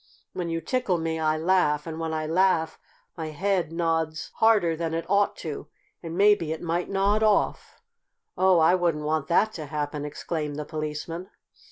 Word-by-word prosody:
When 175 -2 -3
you 165 0 -2
tickle 205 -1 0
me 160 0 -2
I 155 0 +1
laugh, 155 -3 +2
and 160 -1 -6
when 165 -1 -2
I 155 -1 -2
laugh 165 -1 +1 0.4
my 160 -2 -4
head 175 +1 -1
nods 165 -1 -1
harder 210 -7 +4
than 165 0 -2
it 165 - -3
ought 200 +1 +2
to, 150 -1 -5 0.3
and 165 0 -6
maybe 200 -6 +4
it 160 - -3
might 170 +1 -2
nod 200 +2 +2
off." 215 -2 +1 0.6
"Oh, 185 0 +4
I 165 +2 +5
wouldn't 170 -5 0
want 155 -2 0
that 215 +5 +2
to 155 -3 -6
happen!" 145 0 -3
exclaimed 150 0 -4
the 150 0 -4
Policeman. 155 +4 -5
165 Hz, 175 wpm, -26 LUFS, 155-185 Hz, 0.6 s, I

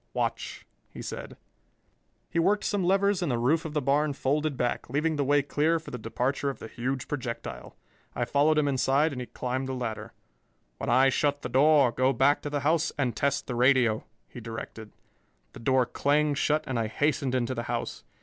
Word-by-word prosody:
"Watch," - - -3 0.2
he - - -9
said. - - -7 0.9
He - - 0
worked 200 +5 +2
some 205 -3 0
levers 195 +1 +2
and 170 -6 0
the 120 - 0
roof 150 +8 +1
of 155 -1 -6
the 150 - 0
barn 145 +2 +2
folded 145 +1 -1
back, 120 -1 -2
leaving 155 +4 0
the 145 - 0
way 145 +1 +3
clear 155 +4 +1
for 160 - -9
the 125 - -5
departure 125 +5 -1
of 135 - -5
the - - -8
huge 130 +3 -3
projectile. 125 -5 -5 0.4
I 120 - 0
followed 145 +5 +3
him 150 -1 +3
inside 140 +3 +2
and 130 -2 -5
he 125 - -6
climbed 130 +1 -3
the 130 - -3
ladder. 115 -4 -5 0.7
"When - - -3
I 130 +3 +5
shut 145 +1 0
the - - -3
door, 140 0 +5
go 130 +3 +2
back 135 +4 +3
to 145 - -4
the 145 -1 -2
house 160 +2 +2
and 130 -5 0
test 140 0 0
the 125 - -4
radio," 120 -3 +3 0.2
he - - -10
directed. 115 -1 -8 0.6
The - - -10
door 130 +1 +2
clanged 145 +3 +1
shut 150 +1 +1
and 130 -5 -2
I 110 - 0
hastened 140 +2 0
into 125 0 0
the 120 - -3
house. 120 -1 -3
140 Hz, 200 wpm, -27 LUFS, 125-150 Hz, 0.9 s, I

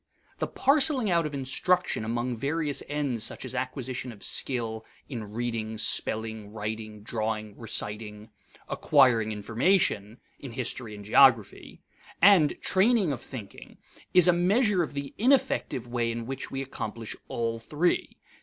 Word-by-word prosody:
The - - -1
parceling 275 -5 +3
out 170 -2 +2
of 145 - -7
instruction 140 +4 0
among 120 +2 -2
various 145 +3 -1
ends 140 -6 -2
such - - -4
as 130 - -4
acquisition 130 -1 -4
of 105 -3 -13
skill 115 -4 -1 0.2
(in 110 -6 -6
reading, 115 -1 -3
spelling, 110 -1 0
writing, 110 0 -6
drawing, 110 -1 -3
reciting); 105 -1 -3 0.4
acquiring 125 -7 +3
information 110 - 0 0.2
(in 135 -4 -8
history 120 -3 -3
and 105 -1 -10
geography), 115 -1 +3 0.4
and 180 -5 +5
training 195 -2 +3
of 130 -3 -4
thinking 115 -7 -10 0.3
is 180 -1 +6
a 180 - +6
measure 195 +3 +2
of 155 -3 -4
the 140 -1 -5
ineffective 235 - +2
way 120 -1 -1
in 115 0 -5
which 135 +2 -5
we 135 0 -3
accomplish 115 -4 -6
all 115 -1 -2
three. 150 +9 -1
125 Hz, 135 wpm, -27 LUFS, 110-150 Hz, 0.4 s, is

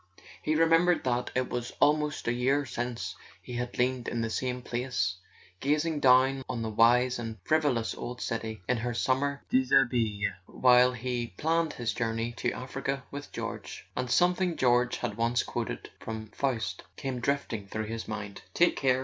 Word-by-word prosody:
He 155 - 0
remembered 165 +2 +4
that 125 -1 0
it 130 0 +1
was 120 -1 -3
almost 150 -2 +2
a 120 - +2
year 135 +4 +2
since 120 -2 -4 0.2
he 125 - -9
had 125 0 -4
leaned 125 0 +1
in 120 - -1
the 115 -1 -2
same 125 +1 -2
place, 125 -7 -1 0.4
gazing 150 +2 +1
down 130 0 +5
on 115 -2 -2
the 110 - -3
wise 120 +3 +4
and 115 -2 -5
frivolous 145 -8 +1
old 125 +1 -6
city 110 -3 -4
in 125 - +2
her 120 +1 -2
summer 140 +3 0
dishabille 120 -6 +3 0.2
while 125 0 +5
he 120 -3 -3
planned 165 0 +1
his 115 -4 -2
journey 115 0 -1
to 120 - 0
Africa 135 +1 -4
with 145 0 -7
George; - - -6
and 125 - -2
something 180 +3 +2
George 125 -1 +3
had 105 - -3
once 115 +1 +2
quoted - - -4
from 110 -1 -6
Faust 115 -11 -2
came 130 +1 -3
drifting 120 -5 -1
through 110 +2 -3
his 115 +1 -5
mind: 105 -2 -5
"Take 175 0 +4
care! 130 -2 +3
125 Hz, 165 wpm, -29 LUFS, 115-135 Hz, 0.4 s, down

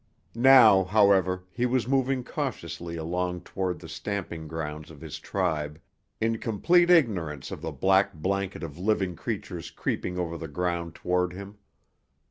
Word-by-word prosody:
Now, 120 -5 +7
however, 95 -2 +3
he 125 +6 0
was 125 -2 0
moving 135 -1 +1
cautiously 85 - -4
along 90 +2 -2
toward 95 -2 -3
the 80 - -11
stamping 85 -1 -5
grounds 75 -1 -5
of 80 -3 -13
his - - -7
tribe, 75 0 -2 0.4
in 115 0 0
complete 175 - +3
ignorance 95 - +2
of - - -6
the - - -4
black 95 -1 +2
blanket 95 +3 -2
of 80 0 -7
living 95 -2 0
creatures 90 -4 -5
creeping 90 +2 -3
over 85 -2 -3
the 80 - -5
ground 85 +1 -2
toward 90 0 0
him. 100 +2 -10
90 Hz, 145 wpm, -27 LUFS, 85-110 Hz, 0.4 s, Now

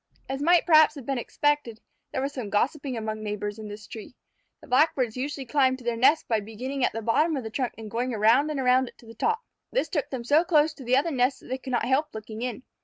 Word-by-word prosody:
As 270 +1 -4
might 345 +3 +4
perhaps 315 -2 +6
have 275 -4 -9
been 270 -1 -1
expected, 290 -3 -1 0.3
there - - -2
was 280 +1 -3
some 240 -6 -5
gossipping 265 +4 -1
among 215 -1 -4
neighbors 210 0 -4
in 215 - -7
this 210 +1 -9
tree. 220 +2 -10 0.4
The - - -15
Blackbirds 255 -3 +2
usually 275 +1 -4
climbed 260 0 +2
to 255 - -14
their 235 -1 -1
nest 265 +7 +3
by 225 -2 +1
beginning 245 +6 -5
at - - +3
the 225 - -5
bottom 300 +8 +2
of 260 - -4
the 220 - -6
trunk 250 +1 -2
and 220 -2 -9
going 245 +2 -1
around 225 +7 +3
and 300 -2 -2
around 255 0 +3
it - - -13
to - - -18
the 225 - -11
top. 450 - 0 0.3
This - - 0
took 305 -8 -2
them 255 -3 -4
so 290 +7 +4
close 315 -3 +3
to 280 - -11
the 250 +1 +3
other 315 +5 +1
nests 255 -1 +1
that - - -15
they 260 +1 -3
could 260 - -9
not 240 - +1
help 285 +3 0
looking 220 +1 -7
in. 250 0 -4
255 Hz, 255 wpm, -26 LUFS, 225-290 Hz, 0.4 s, perhaps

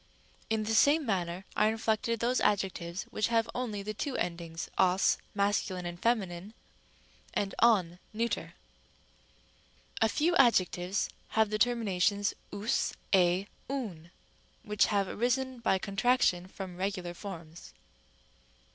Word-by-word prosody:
In 220 -1 +1
the 220 +1 -1
same 290 +7 +5
manner 185 -3 -2
are 215 - +4
inflected 225 +1 0
those 245 +2 +1
adjectives 190 -3 0
which 215 - 0
have 230 -1 +2
only 220 -5 -3
the 215 +1 -4
two 265 +5 -3
endings 170 -1 -3
os 185 0 +3 0.2
(masc.: 200 -1 +1
and 175 -2 -5
fem.) 235 -2 +3 1.1
and 195 -1 -1
ον 185 -7 +4
(neut.). 230 +2 0
Rem. - - -8
e. - - -16 1.5
A 225 - +5
few 340 +8 +1
adjectives 190 -6 +3 0.3
have 220 -1 +4
the 215 - -1
terminations 205 -4 +1 0.2
ovs, 205 +3 -1 0.2
ἡ, 180 0 +4 0.2
ovr, 200 -12 -4 0.5
which 210 -1 +2
have 200 -2 +1
arisen 255 +3 -1
by 230 -4 +2
contraction 200 -2 +1
from 185 -2 -8
regular 185 -2 -3
forms. 170 -4 -9
205 Hz, 130 wpm, -30 LUFS, 180-230 Hz, 1.5 s, same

